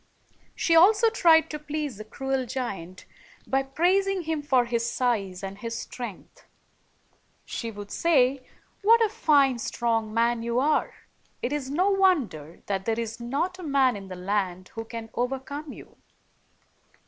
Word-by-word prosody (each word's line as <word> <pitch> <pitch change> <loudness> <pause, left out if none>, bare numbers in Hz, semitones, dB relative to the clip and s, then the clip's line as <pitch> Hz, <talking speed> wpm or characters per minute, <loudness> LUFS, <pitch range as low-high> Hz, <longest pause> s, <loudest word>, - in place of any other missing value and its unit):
She 330 - +2
also 420 +7 +6
tried 330 -7 +5
to 300 - -4
please 300 -5 -4
the 215 - -7
cruel 265 +3 -3
giant 195 -8 -5 0.4
by 270 0 +1
praising 365 +7 +1
him 320 -1 -2
for 260 -4 +2
his 235 0 -1
size 200 -8 -1
and 195 +1 -6
his 230 0 -4
strength. 240 -7 -8 1.0
She 230 - -4
would 205 -2 -9
say, 270 -5 +2 0.4
"What 455 +3 +6
a - - -2
fine, 285 - +3
strong 225 -2 -1
man 230 +1 +1
you 235 +1 0
are! 300 +3 +1 0.5
It 250 - -1
is 280 -3 -3
no 365 +8 +2
wonder 275 - +1
that 195 -1 -2
there 225 0 0
is 230 0 -4
not 285 +10 -2
a - - -7
man 275 -5 +3
in 195 -1 -8
the 185 - -7
land 185 -1 -2
who 225 0 -7
can 225 -1 -8
overcome 270 +4 -3
you." - - -13
255 Hz, 155 wpm, -26 LUFS, 225-305 Hz, 1.0 s, also